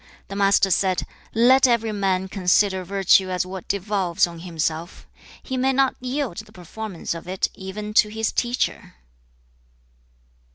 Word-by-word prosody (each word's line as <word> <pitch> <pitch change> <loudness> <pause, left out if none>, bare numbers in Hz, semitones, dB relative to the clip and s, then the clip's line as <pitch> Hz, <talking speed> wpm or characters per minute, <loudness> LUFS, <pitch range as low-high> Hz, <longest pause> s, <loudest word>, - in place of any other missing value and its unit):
The 195 - -6
Master 195 -1 +3
said, 185 0 +1 0.3
'Let 255 +3 +6
every 230 -2 +1
man 190 -2 0
consider 190 0 +2
virtue 190 0 +3
as 180 0 -1
what 185 0 -8
devolves 195 -3 0
on 170 -1 -9
himself. 165 0 -4 0.4
He 260 - -4
may 265 +1 +2
not 270 0 +2
yield 255 -5 -3
the 215 0 -9
performance 190 0 -6
of 165 +1 -9
it 185 +1 0
even 210 +2 -7
to 210 - +5
his 220 +1 -2
teacher.' 240 - -2
195 Hz, 140 wpm, -23 LUFS, 185-220 Hz, 0.4 s, Let